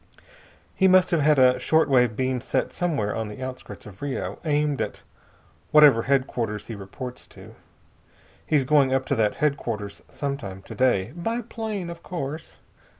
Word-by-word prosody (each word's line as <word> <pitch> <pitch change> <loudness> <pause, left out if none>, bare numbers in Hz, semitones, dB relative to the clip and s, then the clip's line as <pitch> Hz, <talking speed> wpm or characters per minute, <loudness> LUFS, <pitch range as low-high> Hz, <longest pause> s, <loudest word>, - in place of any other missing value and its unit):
He 190 - +3
must 185 -1 +5
have 170 -3 +2
had 150 0 +4
a 125 -1 +5
short 160 +5 +3
wave 125 -5 +3
beam 130 0 -1
set - - -2
somewhere 145 -13 -1
on 110 -1 -3
the 105 +5 -8
outskirts 130 -5 -8
of 100 -2 -13
Rio, 140 -2 -4
aimed 150 -2 0
at - - -5 0.7
whatever 150 -6 +7
headquarters 115 -6 -1
he 115 - -7
reports 110 +5 -8
to. - - -14 0.9
He's 150 -3 +2
going 140 -1 +3
up 130 0 +1
to - - 0
that 105 -2 +1
headquarters 115 -9 -2
some 140 -1 -3
time 95 -6 -8
to - - -9
day, 120 -5 +1
by 225 +7 -2
plane, 215 -6 -5
of 170 - -10
course. 155 -3 -6
130 Hz, 165 wpm, -24 LUFS, 115-155 Hz, 0.9 s, whatever